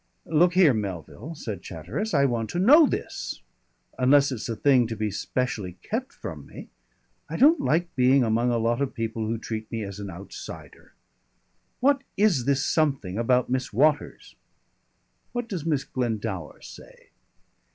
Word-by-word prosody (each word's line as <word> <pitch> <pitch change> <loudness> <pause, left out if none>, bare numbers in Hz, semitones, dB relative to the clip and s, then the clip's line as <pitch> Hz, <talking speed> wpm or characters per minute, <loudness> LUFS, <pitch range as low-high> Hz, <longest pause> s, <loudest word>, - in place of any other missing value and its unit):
"Look 170 +3 +3
here, 180 -7 +6
Melville," 105 - -5
said 105 - -6
Chatteris, 95 - -5
"I 140 -1 +4
want 115 -4 -1
to - - -4
know 285 - +7
this. - - -4 0.6
Unless 140 +2 +5
it's 120 -2 -5
a 115 - -2
thing 130 -2 +3
to 115 - -4
be 110 -1 -2
specially 100 -4 -3
kept 250 +4 -3
from - - -8
me.... - - -11 0.6
I - - -4
don't 310 +5 +6
like 170 +2 0
being 130 +1 +4
among 115 +2 +1
a 120 - +1
lot 115 +2 0
of 140 0 -2
people 115 -2 -3
who 115 +1 -1
treat 110 -1 -6
me 115 -1 -3
as 100 0 -7
an 100 -1 -6
outsider. 95 +2 -10 0.9
What 275 +1 +3 0.2
is 190 - +3
this 140 0 +1
something 135 - 0
about 125 +1 +2
Miss 130 0 -1
Waters?" 150 +6 0 1.0
"What 240 -1 -3
does 175 -8 -4
Miss 145 -4 +1
Glendower 110 - -4
say?" - - -14
125 Hz, 160 wpm, -25 LUFS, 110-155 Hz, 1.0 s, know